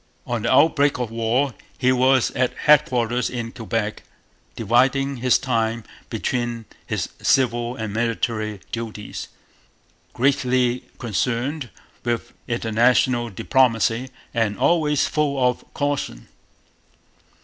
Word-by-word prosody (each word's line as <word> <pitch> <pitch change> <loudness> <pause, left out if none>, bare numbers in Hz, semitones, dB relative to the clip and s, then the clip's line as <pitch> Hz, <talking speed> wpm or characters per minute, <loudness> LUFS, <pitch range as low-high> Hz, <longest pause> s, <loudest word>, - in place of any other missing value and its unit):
On 120 -2 -2
the - - 0
outbreak 145 +1 +4
of 125 -3 -3
war 115 +4 0 0.2
he 130 0 +3
was 130 0 +3
at 125 -1 -1
headquarters 125 -5 +3
in 115 -2 -4
Quebec, 110 -2 -3 0.5
dividing 130 +5 +2
his 125 +1 +3
time 115 -3 -1 0.3
between 120 -2 -2 0.2
his - - -2
civil 120 -2 +2
and 110 -4 -5
military 110 -2 -1
duties, 110 -3 -5 0.9
greatly 130 -2 +1
concerned 125 +5 -2 0.3
with 120 -1 -2
international 120 +1 +2
diplomacy, 115 +2 +1 0.2
and 110 -4 0
always 150 -4 +2
full 150 -2 0
of 125 - -1
caution. 145 - -2
120 Hz, 105 wpm, -22 LUFS, 115-130 Hz, 0.9 s, outbreak